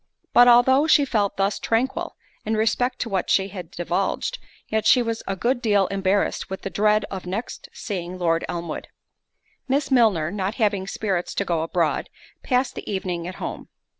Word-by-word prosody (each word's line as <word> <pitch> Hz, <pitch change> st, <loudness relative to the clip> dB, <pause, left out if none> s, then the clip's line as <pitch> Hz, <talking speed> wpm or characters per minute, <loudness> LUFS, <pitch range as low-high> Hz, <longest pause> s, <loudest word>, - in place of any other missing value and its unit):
But 245 Hz, 0 st, +7 dB
although 260 Hz, +5 st, +6 dB
she 295 Hz, -2 st, +5 dB
felt 210 Hz, -6 st, 0 dB
thus 195 Hz, +1 st, 0 dB
tranquil, 235 Hz, +4 st, -1 dB, 0.3 s
in 220 Hz, 0 st, -1 dB
respect 230 Hz, +4 st, +1 dB
to -, -, -1 dB
what 190 Hz, -2 st, -1 dB
she 195 Hz, 0 st, +2 dB
had 180 Hz, -4 st, -8 dB
divulged, 185 Hz, -, -2 dB, 0.3 s
yet 220 Hz, 0 st, 0 dB
she 250 Hz, -, +6 dB
was 230 Hz, -1 st, -3 dB
a 195 Hz, -, -1 dB
good 240 Hz, +5 st, 0 dB
deal 205 Hz, -4 st, +3 dB
embarrassed 195 Hz, 0 st, 0 dB
with 190 Hz, -, -6 dB
the 195 Hz, -, -4 dB
dread 210 Hz, +1 st, +2 dB
of 190 Hz, -2 st, -6 dB
next 205 Hz, +7 st, -5 dB
seeing 185 Hz, -4 st, -5 dB
Lord 165 Hz, -2 st, +1 dB
Elmwood. 170 Hz, -2 st, -5 dB, 0.8 s
Miss 275 Hz, +1 st, 0 dB
Milner, 210 Hz, -11 st, +3 dB
not 200 Hz, +1 st, -2 dB
having 205 Hz, -5 st, 0 dB
spirits 195 Hz, -3 st, -2 dB
to 200 Hz, -, 0 dB
go 170 Hz, -3 st, 0 dB
abroad, 165 Hz, -1 st, 0 dB, 0.3 s
passed 250 Hz, 0 st, 0 dB
the -, -, -7 dB
evening 180 Hz, -3 st, -3 dB
at 185 Hz, -, -6 dB
home. -, -, -6 dB
200 Hz, 175 wpm, -23 LUFS, 185-235 Hz, 0.8 s, But